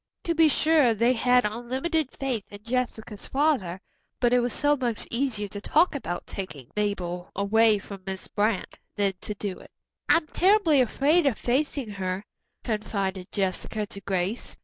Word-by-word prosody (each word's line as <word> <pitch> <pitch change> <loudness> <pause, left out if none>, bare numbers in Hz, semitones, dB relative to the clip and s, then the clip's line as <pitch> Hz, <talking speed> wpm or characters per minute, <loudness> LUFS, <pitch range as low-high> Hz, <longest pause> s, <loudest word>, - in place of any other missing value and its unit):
To 335 - 0
be 325 -1 +5
sure 300 -6 +4
they 235 +4 +3
had 250 0 +3
unlimited 260 +8 -1
faith 255 -6 -2
in 205 0 -11
Jessica's 230 -3 -3
father, 265 - +1 0.4
but 245 -1 +3
it 250 - +5
was 245 0 0
so 290 +5 +3
much 245 -5 -2
easier 235 -4 -1
to 205 +1 -6
talk 325 - +3
about 175 - -4
taking 150 -10 -7
Mabel 180 -4 -2
away 215 +2 +4
from 200 -1 -9
Miss 190 -1 -5
Brant 210 -1 -1 0.2
than 200 -2 +1
to 210 - -5
do 200 -2 -4
it. - - -14 0.4
"I'm 330 -1 +5
terribly 360 -4 +4
afraid 285 +7 +3
of 250 - +1
facing 265 -1 -1
her," 190 -1 -3 0.4
confided 200 -4 -2
Jessica 200 +2 -2
to 200 -1 -10
Grace. 190 +4 -2
225 Hz, 160 wpm, -26 LUFS, 200-270 Hz, 0.4 s, be